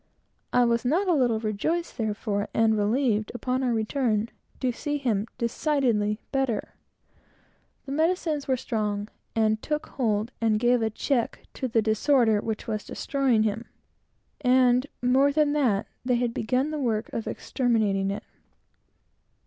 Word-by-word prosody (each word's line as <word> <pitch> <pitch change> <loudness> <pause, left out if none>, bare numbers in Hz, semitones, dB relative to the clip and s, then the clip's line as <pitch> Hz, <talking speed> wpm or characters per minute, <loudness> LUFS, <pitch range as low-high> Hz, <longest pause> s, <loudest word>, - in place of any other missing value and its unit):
I 245 0 +4
was 235 -1 +1
not 335 +11 +1
a 360 - +4
little 245 -7 +2
rejoiced, 230 +11 -2
therefore, 210 -2 -1
and 225 -1 +4
relieved, 215 +1 +1
upon 255 +1 -1
our 255 -2 +1
return, 225 -1 0 0.3
to 255 -2 +1
see 290 +5 -3
him 230 -6 0
decidedly 235 -4 +1
better. 265 -6 -1 1.1
The 270 - -7
medicines 315 -1 0
were 260 -1 +2
strong, 210 -3 -2 0.3
and 220 -1 +2
took 300 0 -2
hold 220 -2 -1
and 220 -2 +2
gave 240 +1 +3
a 220 - +1
check 235 +2 -1
to 260 - -3
the 225 -2 +1
disorder 220 0 +3
which 220 -1 -4
was 215 -3 -3
destroying 265 -6 +1
him; 220 +2 -2 0.8
and, 250 +1 +4 0.2
more 265 +3 +4
than 295 0 +2
that, 245 -10 +2 0.2
they 250 0 +2
had 240 -1 0
begun 255 +7 0
the 305 - -3
work 225 -5 -1
of 225 - -3
exterminating 215 -6 0
it. 200 +1 -4
235 Hz, 145 wpm, -26 LUFS, 215-270 Hz, 1.1 s, I